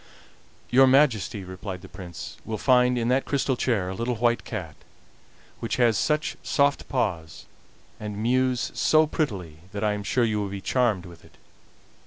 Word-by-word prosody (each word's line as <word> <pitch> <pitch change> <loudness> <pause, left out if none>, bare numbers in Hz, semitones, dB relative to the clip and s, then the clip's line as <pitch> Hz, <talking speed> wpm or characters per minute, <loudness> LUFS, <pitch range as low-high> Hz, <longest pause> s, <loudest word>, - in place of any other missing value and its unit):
"Your 130 +2 +7
Majesty," 125 -7 +3
replied 95 0 -7
the - - -9
Prince, 90 -3 -9
"will 110 - -4
find 125 +1 +3
in 115 -1 0
that 130 +2 +2
crystal 140 -1 0
chair 115 -7 0
a 95 - -3
little 115 +5 -2
white 120 +2 +1
cat, 90 -9 -6 0.9
which 115 - -2
has 120 -3 +3
such 150 +8 0
soft 140 -1 +1
paws, 85 - -2 0.5
and 105 -1 -5
mews 125 +3 +1
so 155 0 +4
prettily, 95 - -3
that 100 +1 -3
I 105 -1 +2
am 105 - -4
sure 120 +4 +1
you 110 -2 +1
will 100 - -3
be 100 0 -5
charmed 105 -2 +1
with 85 -2 -13
it." - - -20
115 Hz, 170 wpm, -25 LUFS, 95-130 Hz, 0.9 s, Your